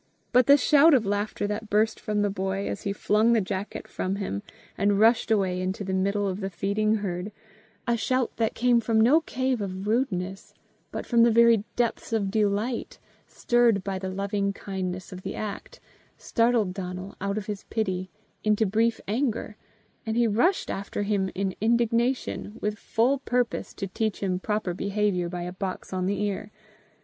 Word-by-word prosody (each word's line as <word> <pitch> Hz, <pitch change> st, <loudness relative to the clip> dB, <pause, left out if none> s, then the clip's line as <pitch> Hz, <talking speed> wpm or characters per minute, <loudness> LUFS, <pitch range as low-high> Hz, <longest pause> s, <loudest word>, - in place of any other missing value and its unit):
But 250 Hz, 0 st, +5 dB
the 280 Hz, +1 st, +8 dB
shout 295 Hz, +2 st, +6 dB
of 235 Hz, -5 st, +2 dB
laughter 205 Hz, +1 st, -1 dB
that 210 Hz, +1 st, -4 dB
burst 215 Hz, +2 st, +2 dB
from 210 Hz, -1 st, -1 dB
the 205 Hz, -, +1 dB
boy, 195 Hz, 0 st, -2 dB
as -, -, -4 dB
he 200 Hz, -, -2 dB
flung 215 Hz, +3 st, +2 dB
the 230 Hz, -, +4 dB
jacket 190 Hz, 0 st, -4 dB
from 185 Hz, +1 st, -2 dB
him, 190 Hz, -, -3 dB, 0.3 s
and 200 Hz, 0 st, +2 dB
rushed 225 Hz, +2 st, +4 dB
away 190 Hz, -4 st, +1 dB
into 185 Hz, +2 st, -2 dB
the 190 Hz, -1 st, -3 dB
middle 200 Hz, +2 st, +1 dB
of 190 Hz, 0 st, -3 dB
the 195 Hz, -1 st, -3 dB
feeding 200 Hz, +4 st, 0 dB
herd, 195 Hz, -1 st, -3 dB, 0.6 s
a 235 Hz, -, +3 dB
shout 255 Hz, +1 st, 0 dB
that 225 Hz, -1 st, 0 dB
came 245 Hz, 0 st, +4 dB
from 225 Hz, -1 st, +1 dB
no 265 Hz, +9 st, +5 dB
cave 260 Hz, -5 st, -1 dB
of 190 Hz, -1 st, -4 dB
rudeness, 195 Hz, -5 st, -2 dB, 0.4 s
but -, -, -5 dB
from 235 Hz, -2 st, +3 dB
the 235 Hz, -, +7 dB
very 230 Hz, -2 st, +5 dB
depths 235 Hz, -1 st, -1 dB
of 200 Hz, -3 st, 0 dB
delight, 215 Hz, +3 st, 0 dB, 0.3 s
stirred 235 Hz, -5 st, +2 dB
by 195 Hz, -1 st, -3 dB
the 190 Hz, 0 st, -4 dB
loving 200 Hz, +1 st, -1 dB
kindness 185 Hz, -2 st, -5 dB
of 185 Hz, -, -8 dB
the -, -, -5 dB
act, 210 Hz, -2 st, -6 dB, 0.4 s
startled 230 Hz, -5 st, +1 dB
Donal 185 Hz, 0 st, -6 dB
out 200 Hz, +1 st, -1 dB
of 210 Hz, -, -3 dB
his 205 Hz, -2 st, -5 dB
pity 185 Hz, -4 st, -2 dB, 0.3 s
into 215 Hz, +1 st, +3 dB
brief 225 Hz, +3 st, +1 dB
anger, 225 Hz, -1 st, -1 dB, 0.5 s
and 225 Hz, 0 st, -2 dB
he 240 Hz, -, +4 dB
rushed 245 Hz, -, +2 dB
after 200 Hz, +1 st, -3 dB
him 200 Hz, -2 st, 0 dB
in 195 Hz, -1 st, -1 dB
indignation, 235 Hz, 0 st, 0 dB
with 210 Hz, 0 st, -2 dB
full 255 Hz, +5 st, +1 dB
purpose 245 Hz, -2 st, -1 dB
to 195 Hz, -, -3 dB
teach 215 Hz, +2 st, -2 dB
him 185 Hz, -2 st, 0 dB
proper 210 Hz, -2 st, -1 dB
behaviour 200 Hz, -2 st, 0 dB
by 175 Hz, 0 st, -4 dB
a 180 Hz, +1 st, -5 dB
box 190 Hz, 0 st, -5 dB
on 185 Hz, 0 st, 0 dB
each 200 Hz, 0 st, -1 dB
ear. 205 Hz, 0 st, -2 dB
210 Hz, 180 wpm, -26 LUFS, 195-230 Hz, 0.6 s, the